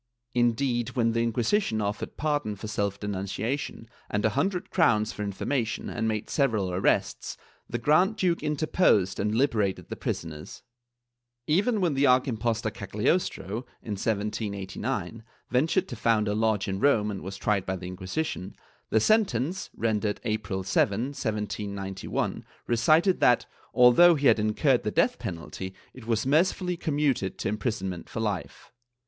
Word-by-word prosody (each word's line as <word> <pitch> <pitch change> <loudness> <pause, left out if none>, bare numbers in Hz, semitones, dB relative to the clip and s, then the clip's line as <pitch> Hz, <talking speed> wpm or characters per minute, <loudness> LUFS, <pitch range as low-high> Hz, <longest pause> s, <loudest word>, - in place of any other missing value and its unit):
Indeed, 120 0 +1
when 115 -2 +2
the 115 0 0
Inquisition 115 - +1
offered 105 0 -3
pardon 145 -8 -1
for 105 +2 -7
self 100 -2 -2
denunciation, 105 +5 -3 0.2
and 105 0 0
a - - +5
hundred 185 - -1
crowns 110 - +3
for 105 - -4
infor 100 -2 -4
mation, 120 -6 -1
and 115 -1 0
made 110 -1 -2
several 110 -10 +1
arrests, 90 +1 0 0.3
the 120 - -2
Grand 155 - +3
duke 180 -4 +1
interposed 150 - +2
and 105 +2 0
liberated 110 -7 0
the - - -4
prisoners/ 75 -2 -5 0.8
Even 205 - +2
when 175 -5 +2
the 140 +1 +3
arch 125 +2 +4
impostor 115 -2 -1
Cagliostro, 105 - -1 0.2
in 110 - -6
1789, 105 0 -3 0.3
ventured 160 +9 +2
to 120 - -6
found 110 -1 +2
a 105 - +1
lodge 110 -2 +1
in 95 0 -2
Rome 105 -5 +3
and 100 - -5
was 95 +1 -6
tried 100 -2 0
by 95 - -1
the 90 -1 -8
Inquisition, 95 - -4 0.3
the 110 - +3
sentence, 185 - +1
rendered 110 -2 0
April 100 -3 -2
7, 100 +2 +2
1791, 105 -6 -3 0.2
recited 155 - +3
that, 120 -1 +4 0.3
although 130 +8 +7
he 145 -1 -2
had 115 - +6
incurred 120 +5 +2
the 105 - -2
death 170 - +1
penalty, 95 -1 -6 0.2
it 125 -3 -12
was 115 -1 0
mercifully 180 +5 +2
commuted 145 - 0
to - - -3
imprisonment 100 -5 -3
for - - -5
life. 105 -5 -4
110 Hz, 150 wpm, -27 LUFS, 100-140 Hz, 0.8 s, although